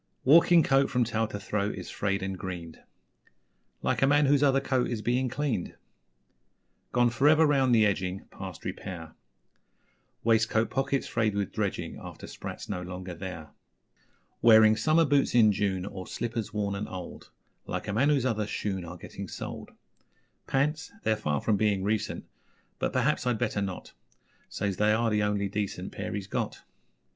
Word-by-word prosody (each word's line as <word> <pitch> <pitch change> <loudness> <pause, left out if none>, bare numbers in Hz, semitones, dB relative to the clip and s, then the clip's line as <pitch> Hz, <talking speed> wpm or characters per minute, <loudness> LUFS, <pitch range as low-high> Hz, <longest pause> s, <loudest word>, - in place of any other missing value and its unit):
Walking 165 +4 +6
coat 135 0 +3
from 125 -2 +2
tail 115 -1 0
to 105 - -6
throat 105 0 -2
is - - -7
Frayed 100 -1 -1
and 95 0 -3
greened 90 -3 -7 1.0
Like - - 0
a 135 - +5
man 145 +1 +4
whose 140 0 +4
other 135 -2 +4
coat 130 -2 0
is 115 -3 -3
Being 125 +2 +1
cleaned; 130 -8 -2 1.2
Gone 120 -1 +3
for 130 +5 +2
ever 155 +1 +6
round 135 -4 +3
the 110 -1 +5
edging 95 -2 -1
Past 95 -3 -8
repair 80 -4 -6 1.1
Waistcoat 110 0 +2
pockets 135 +1 0
frayed 110 -3 0
with 100 -2 -1
dredging - - -3
After - - -9
'sprats' - - -8
no 90 -3 -3
longer 90 0 -6
there. 85 -4 -7 0.9
Wearing 110 -1 +7
summer 160 +7 +3
boots 140 -3 +2
in 110 -3 +6
June, 95 -2 -1
or 95 -2 -7
Slippers 115 -2 -3
worn 105 -1 -1
and 100 +1 -4
old 90 -2 -8 0.4
Like - - -4
a 100 - -2
man 130 +7 +3
whose 140 -4 +2
other 110 -4 0
shoon 95 -3 -3
are 85 +1 -8
Getting - - -8
soled. - - -7 0.8
Pants? 150 +5 0
They're 110 - +2
far 75 -9 -1
from 105 -2 +2
being 100 -2 +1
recent 105 +1 -1 0.5
But, - - 0
perhaps, 125 - +1
I'd 120 -2 +1
better 110 -3 -1
not 95 -2 -5 0.6
Says 100 -3 -2
they 105 0 +3
are 115 +1 +1
the 105 0 +2
only 105 -1 0
decent 100 0 -3
Pair - - -5
he's 100 -2 -4
got. 100 - -3
110 Hz, 170 wpm, -28 LUFS, 95-130 Hz, 1.2 s, Wearing